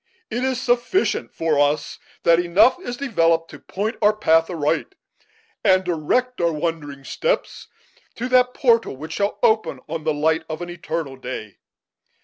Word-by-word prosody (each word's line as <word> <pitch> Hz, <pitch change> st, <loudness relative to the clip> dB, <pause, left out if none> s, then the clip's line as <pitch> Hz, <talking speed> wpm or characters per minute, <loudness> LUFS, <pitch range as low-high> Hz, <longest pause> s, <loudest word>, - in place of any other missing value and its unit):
It 245 Hz, -, -2 dB
is 260 Hz, -2 st, 0 dB
sufficient 245 Hz, +9 st, 0 dB
for 160 Hz, -3 st, +1 dB
us 145 Hz, +1 st, 0 dB, 0.2 s
that 165 Hz, 0 st, +5 dB
enough 200 Hz, -, +4 dB
is 245 Hz, -10 st, -6 dB
developed 165 Hz, -11 st, +1 dB
to -, -, -11 dB
point 210 Hz, +5 st, -4 dB
our 210 Hz, 0 st, +4 dB
path 165 Hz, -3 st, +3 dB
aright, 165 Hz, -, -1 dB, 0.7 s
and 185 Hz, -2 st, +4 dB
to 180 Hz, -, 0 dB
direct 250 Hz, +10 st, 0 dB
our 170 Hz, -1 st, +2 dB
wandering 150 Hz, -3 st, -4 dB
steps -, -, -2 dB, 0.5 s
to 245 Hz, -, -3 dB
that 250 Hz, 0 st, +3 dB
portal 230 Hz, -, +2 dB
which 155 Hz, +3 st, -7 dB
shall 200 Hz, +3 st, -1 dB
open 220 Hz, 0 st, +2 dB
on 160 Hz, 0 st, -4 dB
the 155 Hz, -, +1 dB
light 160 Hz, +2 st, +1 dB
of 160 Hz, +2 st, -4 dB
an 175 Hz, -, -6 dB
eternal 160 Hz, -5 st, -5 dB
day. 125 Hz, -5 st, -7 dB
170 Hz, 160 wpm, -22 LUFS, 155-235 Hz, 0.7 s, that